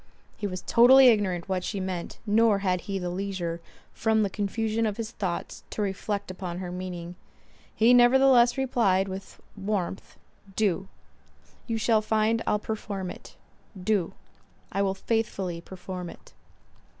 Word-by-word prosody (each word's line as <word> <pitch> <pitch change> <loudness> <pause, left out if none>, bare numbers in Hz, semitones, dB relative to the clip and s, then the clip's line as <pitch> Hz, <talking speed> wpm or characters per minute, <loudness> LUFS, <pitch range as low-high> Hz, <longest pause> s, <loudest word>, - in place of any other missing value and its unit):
He 210 - -3
was 185 -1 -6
totally 255 +2 +7
ignorant 190 -6 +1
what 185 -2 -1
she 200 - -3
meant, 185 -2 -4
nor 220 0 +4
had 180 -1 +1
he 195 -1 -4
leisure, 180 -2 -3 0.3
from 220 -1 +2
the 200 - -1
confusion 220 +2 -1
of 210 -1 -3
his 225 -1 -4
thoughts, 190 -6 -4
to - - -4
reflect 200 0 -3
upon 180 -2 -6
her 180 -1 -5
meaning; 180 -1 -6 0.6
he 230 +3 +5
nevertheless 245 0 +6
replied, 225 -8 +2
with 190 0 -8 0.2
warmth, 195 -2 -3 0.4
"Do. 200 -6 0 0.8
You 230 - -1
shall 220 0 +3
find 220 +1 +1
I'll 210 - +3
perform 205 -3 -4
it.—Do. 190 -1 -5 0.6
I 195 - 0
will 195 -1 +1
faithfully 190 -5 -2
perform 180 0 -7
it." - - -14
200 Hz, 140 wpm, -27 LUFS, 185-220 Hz, 0.8 s, totally